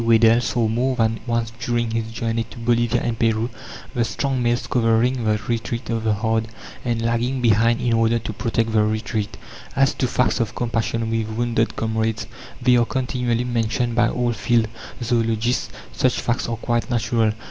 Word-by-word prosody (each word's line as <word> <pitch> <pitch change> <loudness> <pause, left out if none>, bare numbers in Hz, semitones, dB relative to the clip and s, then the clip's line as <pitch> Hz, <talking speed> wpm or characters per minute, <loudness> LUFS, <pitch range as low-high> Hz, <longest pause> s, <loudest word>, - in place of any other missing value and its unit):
Weddell 115 0 +5
saw 120 -1 0
more 125 +4 0
than 115 -2 +1
once 115 -1 0
during 120 -1 -1
his 115 0 -2
journey 115 0 -1
to - - -13
Bolivia 120 0 +1
and 115 -1 -2
Peru, 115 +1 +1 0.4
the 120 - +1
strong 135 +2 -1
males 120 +1 +1
covering 120 +1 +2
the 105 -1 +2
retreat 115 +1 -2
of 115 -1 -1
the 110 -1 +2
herd 110 +1 0 0.4
and 120 -2 -1
lagging 120 +3 0
behind 115 0 +3
in 120 -2 +1
order 115 +1 +3
to 110 -1 -5
protect 115 0 -1
the 110 -1 +3
retreat. 110 -1 -2 0.4
As 135 0 +3
to 130 - 0
facts 125 0 +1
of 115 -2 -1
compassion 115 -1 -1
with 115 -1 0
wounded 115 0 0
comrades, 110 0 -1 0.3
they 125 0 +4
are 120 - +3
continually 125 -2 -1
mentioned 120 0 0
by 120 0 +3
all 120 -1 0
field 115 -1 +2 0.4
zoologists. 115 0 0 0.2
Such 130 -1 +1
facts 120 0 -1
are 115 - -2
quite 120 +1 -1
natural. 115 -2 +1
115 Hz, 175 wpm, -22 LUFS, 115-120 Hz, 0.4 s, Weddell